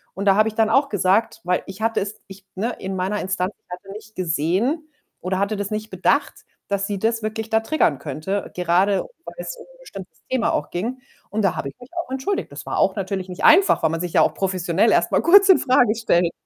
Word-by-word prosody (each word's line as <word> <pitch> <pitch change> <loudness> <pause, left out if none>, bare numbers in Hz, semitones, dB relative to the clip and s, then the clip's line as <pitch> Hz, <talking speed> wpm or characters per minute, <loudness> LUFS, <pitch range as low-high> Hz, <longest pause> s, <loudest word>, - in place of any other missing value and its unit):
Und 200 - -4
da 195 -1 +5
habe 215 +2 +3
ich 215 - -12
dann 220 -1 +2
auch 275 +5 +3
gesagt, 205 +2 +1
weil 180 0 0
ich 195 +3 -10
hatte 225 -2 +1
es 205 +2 -5
ich 195 -1 -13
ne, 220 +6 -2
in 190 0 -4
meiner 190 +3 -1
Instanz, 190 +1 -2
ich - - -53
hatte 180 +2 -9
nicht 215 +1 -12
gesehen 185 - 0 0.3
oder 185 +1 -2
hatte 200 +2 0
das 205 +1 -4
nicht 215 0 -4
bedacht, 190 +10 +1 0.3
dass 200 0 -1
sie 200 -2 -3
das 225 +1 0
wirklich 220 +1 -4
da 220 0 +2
triggern 225 - +1
könnte, 155 +8 -4
gerade 180 +3 +2 0.2
weil - - -9
es - - -5
um 475 - -12
'n - - -21
bestimmtes 195 - -11
Thema 255 -3 +1
auch 150 - -2
ging. 230 +9 -3 0.3
Und 220 - -1
da 190 - +2
habe 140 - -4
ich - - -15
mich 245 - -13
auch 340 -7 -4
entschuldigt. 265 +10 -2
Das - - -8
war - - -3
auch - - +2
natürlich 190 -1 -3
nicht 180 - -7
einfach, 350 - +6
weil 160 - +4
man 165 +1 -2
sich 175 -2 -4
ja - - +5
auch - - +3
professionell 190 +2 +1
erstmal - - +2
kurz 390 +3 +6
in 380 - +8
Frage 245 -4 +3
stellt. 175 -6 +1
205 Hz, 235 wpm, -22 LUFS, 185-230 Hz, 0.3 s, in